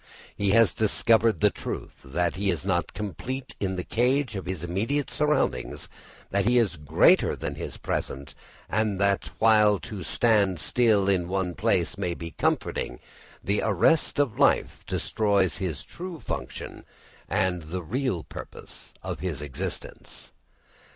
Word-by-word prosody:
He 100 -1 0
has 110 -2 +5
discovered 110 +1 +3
the 105 -1 +5
truth - - -6
that 85 +6 -1
he 100 +2 -1
is 85 -1 -1
not 85 -4 0
complete 130 +6 -5
in 95 -1 -1
the 90 - -3
cage 125 +2 +1
of 95 - -5
his 90 -3 -4
immediate 110 +12 -1
surroundings, 150 - 0 0.4
that 100 0 +1
he 120 +2 +4
is 110 -6 +2
greater 75 -2 +4
than - - -4
his - - -6
present, 70 +3 -4 0.3
and 110 -3 0
that 100 -6 +1
while 105 -2 +5
to 105 -5 -7
stand 100 0 +2
still 110 -1 +3
in 90 -3 +2
one 95 -1 -1
place - - 0
may 85 -1 -1
be 85 0 -7
comforting, - - -1 0.4
the 100 +2 +1
arrest 110 - +3
of 140 -7 +1
life - - +2
destroys 100 -6 +1
his 85 -7 -3
true 180 -2 -8
function - - -6 0.5
and 95 -2 +1
the 85 +3 -5
real 110 - -1
purpose - - -10
of - - -4
his 85 -7 -3
existence. 75 +6 -7
100 Hz, 145 wpm, -26 LUFS, 90-115 Hz, 0.5 s, has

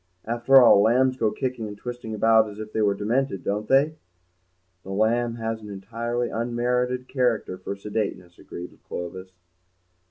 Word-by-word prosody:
After 120 +4 +5
all, 120 -5 +7
lambs 130 +4 +3
go 115 -4 +1
kicking 125 -3 -3
and 105 -1 -8
twisting 120 -1 -6
about 110 0 +4
as 105 - -11
if 110 0 -8
they 110 - 0
were 100 -1 +2
demented, 110 0 -1
don't 105 +2 -2
they?" 145 +4 +3 0.8
"The 95 - -12
lamb 115 +4 +1
has 115 -1 -4
an 105 - -10
entirely 115 +4 -3
unmerited 125 +2 -1
character 120 -8 0
for 100 - -5
sedateness," 100 -4 -4
agreed 90 +1 -9
Clovis. 95 +2 -6
115 Hz, 155 wpm, -25 LUFS, 105-125 Hz, 0.8 s, all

